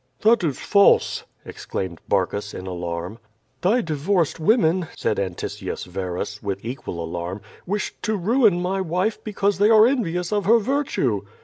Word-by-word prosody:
"That 225 -1 +4
is 145 -6 0
false!". 200 -1 +3 0.2
exclaimed 90 -3 -5
Barcus, 100 +1 0
in 95 - -7
alarm. 85 +3 -5 0.4
"Thy 220 +7 +3
divorced 165 +1 0
women," 180 -2 +3
said - - 0
Antiscius 95 -3 -4
Verus, 90 +2 -4
with 100 0 -4
equal 115 -8 -5
alarm, 85 +4 -5 0.3
"wished 205 +3 -3
to 215 -1 -1
ruin 215 -1 +3
my 190 +2 -1
wife 185 +5 -1
because 200 -2 0
they 205 +1 +5
are 220 -1 +7
envious 180 -8 0
of 205 -2 0
her 230 +4 +6
virtue." 225 - 0
170 Hz, 145 wpm, -23 LUFS, -, 0.4 s, are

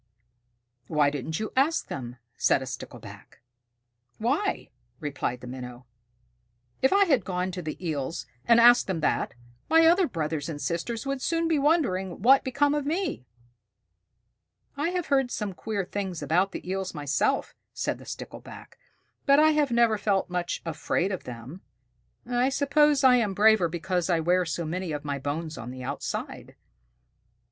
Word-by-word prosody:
"Why 150 -2 +2
didn't 150 +3 -4
you 215 - -4
ask 285 +5 +2
them?" 125 -3 -6 0.2
said 130 - +2
a - - -6
Stickleback. 125 -1 -10 0.8
"Why?" 285 - -1 0.3
replied 135 -4 -3
the - - -9
Minnow. 125 -1 -8 1.0
"If 265 - +4
I 400 +1 +5
had 275 - +2
gone 180 0 -2
to 180 0 -5
the 155 -2 -5
Eels 150 0 -3 0.2
and 235 0 +6
asked 240 +1 +7
them 180 -5 -2
that, 150 - 0 0.3
my 325 +1 +6
other 350 +2 +5
brothers 155 - -3
and 150 -3 -5
sisters 195 - -3
would 275 -1 -2
soon 330 +2 0
be 320 -3 +2
wondering 245 - +1
what 265 +3 +8
had - - -27
become 285 +3 +2
of 295 -1 0
me." 310 - -2 1.5
"I 290 +4 -1
have 360 -2 -2
heard 270 -2 +3
some 210 -5 -3
queer 205 0 -3
things 190 -3 -4
about 185 +4 +2
the - - -8
Eels 190 -1 -3
myself," 145 -1 0 0.2
said - - -3
the - - -13
Stickleback, - - -9 0.5
"but 280 0 +6
I 310 +1 +6
have 300 -2 +2
never 235 -2 +3
felt 195 -3 0
much 180 -1 -2
afraid 165 +3 -1
of 185 - -5
them. 125 +9 -9 0.6
I 245 +2 +1
suppose 285 +1 +3
I 255 -1 +7
am 210 -5 0
braver 210 -4 +5
because 175 +2 -2
I 170 -2 +3
wear 180 +3 +2
so 170 0 -3
many 175 +1 -3
of 150 0 -5
my 140 -1 -2
bones 155 +2 -4
on 120 +1 -7
the 130 0 -8
outside." 140 +2 -5
190 Hz, 165 wpm, -27 LUFS, -, 1.5 s, what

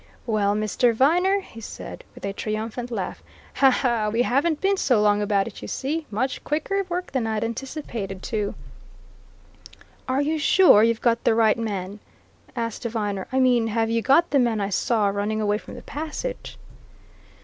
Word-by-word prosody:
"Well, 210 -3 +1
Mr. 215 +3 +1
Viner," 360 - +3
he 225 -11 -12
said - - -8
with - - -8
a 200 - -3
triumphant 220 +4 -4
laugh, 200 -6 -4 0.9
"we 230 +3 +2
haven't 290 +6 +1
been 390 +1 +2
so 250 - +2
long 210 0 +3
about 200 -1 +1
it, - - -9
you - - -7
see! 300 +4 -3
Much 250 +6 -2
quicker 390 +7 -1
work 360 +1 -3
than 255 -4 -1
I'd 220 0 -1
anticipated, 230 -5 -5
too." 210 -3 -2 1.5
"Are 265 +2 +1
you 310 +2 -1
sure 325 - +6
you've 230 0 +2
got 235 -1 +2
the 225 - +3
right 220 -2 +4
man?" 205 -3 -4 0.6
asked 230 -2 -3
Viner. 210 -5 -3
"I 260 - +1
mean 245 -3 +3
have 225 0 0
you 230 0 +1
got 285 +8 +3
the 280 - +4
man 235 -3 +1
I 200 -1 -1
saw 215 +2 +1
running 205 +2 -1
away 210 0 +1
from - - -11
the - - -10
passage?" 315 - -5
230 Hz, 170 wpm, -24 LUFS, 210-275 Hz, 1.5 s, sure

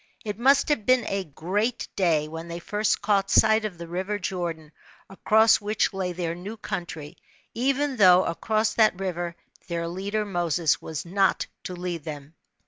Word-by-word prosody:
It 210 0 -4
r^ust 275 +4 +4
have 290 -8 +1
been 255 -1 +4
a 195 0 -1
great 195 - -2
day, 160 -5 +2
when 165 +2 -7
they 170 0 -5
first 210 +5 -1
caught 200 -2 +2
sight 220 0 +4
of 195 -5 -5
the 170 0 -8
river 190 +4 -3
Jordan, 170 -5 -4 0.4
across 220 +3 +4
which 210 0 0
lay 190 -2 -2
their 170 -1 -3
new 195 +6 -8
country, 170 -5 -6 0.4
even 275 +2 0
though 185 -3 +6
across 215 +6 0
that 215 -5 +3
river 175 -3 -3 0.3
their 170 -2 -3
leader 200 +5 -2
Moses 175 -5 0
was 160 0 -5
not 195 +2 +1 0.2
to 180 - -5
lead 175 -3 -4
them. 150 -1 -8
185 Hz, 165 wpm, -25 LUFS, 170-215 Hz, 0.4 s, though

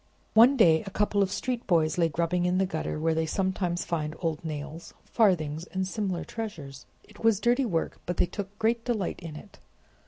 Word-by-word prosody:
One 240 +5 +7
day 165 -8 +5
a - - -2
couple 205 0 +1
of 195 -1 +1
street 250 +1 -3
boys 160 -2 +2
lay 165 -1 +3
grubbing 170 +3 0
in 180 +1 +1
the 190 - +3
gutter 160 -4 -3
where 160 +1 +1
they 160 0 0
sometimes 185 -1 -1
find 155 -2 -2
old 165 -3 -2
nails, 155 +1 -6
farthings, 165 -7 +1
and 190 0 -3
similar 190 -3 -2
treasures. 160 - -7 0.2
It - - -16
was 225 -3 +4
dirty 245 +3 +2
work, 165 -6 -2
but 175 - -2
they - - +4
took 200 +2 -7
great 230 +1 +1
delight 225 -7 -2
in 165 -3 -8
it. 200 +6 -12
180 Hz, 195 wpm, -28 LUFS, 160-210 Hz, 0.2 s, One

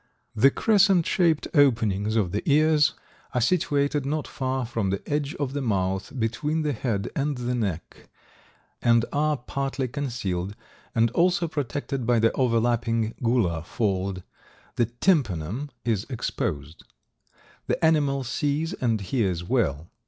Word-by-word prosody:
The 115 +5 +6
crescent 195 -1 +3
shaped 165 -4 +2
openings 110 - +3
of 100 -6 +1
the 105 - -1
ears 155 0 +4 0.4
are - - +3
situated 145 0 +1
not 150 +2 -2
far 130 -1 -2
from 115 -4 -2
the 100 +1 -3
edge 145 +2 -1
of 140 -5 -3
the 145 - -2
mouth, 95 -5 -1
between 145 +8 -1
the 150 -1 0
head 110 -4 -2
and 145 -1 -1
the 125 0 -2
neck, 100 -9 -4 0.7
and 115 -1 +4
are 150 0 +1
partly 135 +1 -3
concealed 110 -9 -3 0.4
and 115 0 +3
also 175 +3 +2
protected 140 -4 -3
by 120 -1 +4
the 115 0 +3
overlapping 115 -2 +1
gular 110 -10 +1
fold; 95 -2 -2 0.5
the 120 - +2
tympanum 120 - 0 0.2
is 110 -4 0
exposed. 80 - -4 0.8
The - - +1
animal 145 -4 +2
sees 145 +5 -1
and 115 -4 0
hears 95 -5 -1
well. 85 - -1
120 Hz, 135 wpm, -25 LUFS, 105-145 Hz, 0.8 s, The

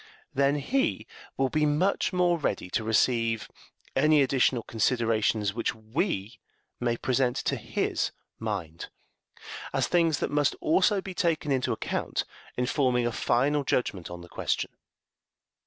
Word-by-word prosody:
Then 140 +1 +3
he 265 - 0 0.3
will 135 - +2
be 150 +3 +2
much 175 +8 +1
more 175 -2 +2
ready 90 -10 -2
to 115 - 0
receive 115 0 +1 0.5
any 155 -2 +5
additional 130 -2 +2
considerations 110 -3 +1
which 115 -1 -1
we 110 - -2 0.4
may 120 -1 0
present 125 0 +1
to - - +1
his - - -1 0.3
mind, 80 +1 -4 0.8
as - - +1
things 165 -3 +3
that - - -2
must 145 -1 +2
also 190 +5 +3
be 190 0 -7
taken 165 -4 0
into 130 -2 +1
account - - -2 0.3
in 125 - +1
forming 125 -3 +1
a 120 - 0
final 140 +6 +1
judgment 105 -9 -1
on 85 0 -8
the 85 - -11
question. - - -2
130 Hz, 140 wpm, -28 LUFS, 115-150 Hz, 0.8 s, any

